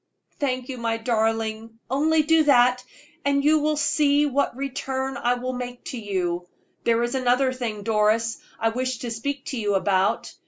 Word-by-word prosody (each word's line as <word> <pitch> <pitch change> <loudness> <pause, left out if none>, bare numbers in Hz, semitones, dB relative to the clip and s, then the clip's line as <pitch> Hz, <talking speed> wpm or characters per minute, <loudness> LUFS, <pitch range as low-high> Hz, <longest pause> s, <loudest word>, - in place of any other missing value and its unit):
"Thank 255 -3 -1
you, 255 -2 -5
my 230 -1 -1
darling! 225 -1 -1
Only 310 +4 +2
do 320 0 +4
that, 250 -2 +4 0.4
and 280 0 +1
you 310 +1 +5
will 305 0 0
see 290 0 +3
what 280 -3 0
return 265 0 -3
I 245 -2 +1
will 255 +1 -4
make 245 -1 -6
to 250 - -4
you. 180 -4 -2 0.4
There 235 0 +3
is 240 - -2
another 255 0 +2
thing, 225 -5 -4
Doris, 220 +1 +1 0.2
I 225 - +2
wish 255 +2 -2
to 240 0 -5
speak 275 +5 -4
to 260 - -3
you 205 -2 0
about. 190 0 +1
245 Hz, 170 wpm, -24 LUFS, 225-275 Hz, 0.4 s, you